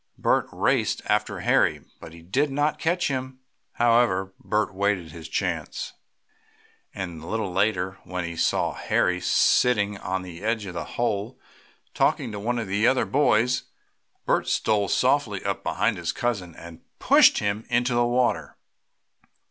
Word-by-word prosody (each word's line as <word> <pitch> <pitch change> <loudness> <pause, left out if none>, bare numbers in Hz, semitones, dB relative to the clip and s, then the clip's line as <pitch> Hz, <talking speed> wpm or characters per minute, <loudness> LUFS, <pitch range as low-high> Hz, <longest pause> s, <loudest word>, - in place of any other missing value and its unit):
Bert - - +1
raced - - 0
after - - 0
Harry - - +2
but 85 +2 -13
did 145 +5 +2
not 145 +2 0
catch 175 +2 0
him. 130 -1 -4 0.3
However, 115 -5 +2
Bert 105 -2 -1
waited 95 -4 -1
his 80 0 -10
chance - - -3 1.0
and 85 -5 -6
a 80 - -10
little 110 -4 -2
later, 95 -1 0
when 90 -1 -4
he 85 0 -6
saw - - +1
Harry 90 0 0
sitting 105 -3 +2
on 95 0 -3
the 90 -1 -10
edge 110 -1 -1
of 90 - -7
the 85 - -4
hole, 115 0 -2 0.5
talking 115 - +1
to 105 - -6
one 120 +4 -1
of 115 - -2
the 100 +4 +2
other 130 - +3
boys, 125 -2 +2 0.6
Bert - - +1
stole 105 -2 +1
softly - - +1
up - - -2
behind - - 0
his - - -2
cousin, 100 -8 -3
and 85 -1 -12 0.2
pushed - - +5
him 105 +1 -1
into 120 +1 +1
the 120 0 +3
water. 120 - 0
105 Hz, 150 wpm, -25 LUFS, 90-120 Hz, 1.0 s, pushed